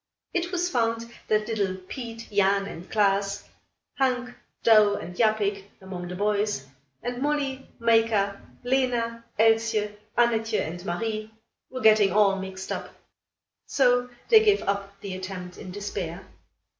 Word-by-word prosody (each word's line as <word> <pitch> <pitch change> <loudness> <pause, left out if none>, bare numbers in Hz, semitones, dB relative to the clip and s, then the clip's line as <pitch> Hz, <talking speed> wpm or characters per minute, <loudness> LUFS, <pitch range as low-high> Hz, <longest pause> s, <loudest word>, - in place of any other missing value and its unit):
It 350 0 -1
was 355 -1 0
found 230 -6 -1 0.2
that 215 0 +1
little 200 -5 0
Piet, 230 +5 -8
Jan 200 0 +3
and 180 -2 -9
Klaas, 200 -1 +1 0.5
Hank, 250 -2 +1 0.3
Douw 215 -2 +6
and 180 - -8
Japik, 210 -3 +1
among 185 -2 -7
the 180 - -6
boys; 205 -6 0 0.4
and 245 +1 -3
Molly, 280 -2 -1
Mayka, 225 -4 +2 0.2
Lena, 245 -3 0
Elsje, 225 -1 +2 0.2
Annatje 225 -2 +2
and 175 +2 -4
Marie 215 +4 -3 0.4
were 255 0 -6
getting 215 -3 +6
all 200 0 +4
mixed 190 0 -6
up. - - -5 0.7
So 245 -2 +3 0.2
they 445 -2 +8
gave 415 -2 +3
up 200 0 -3
the 200 -3 -5
attempt 185 -1 -7
in - - -8
despair. 190 -2 -5
215 Hz, 130 wpm, -26 LUFS, 195-235 Hz, 0.7 s, they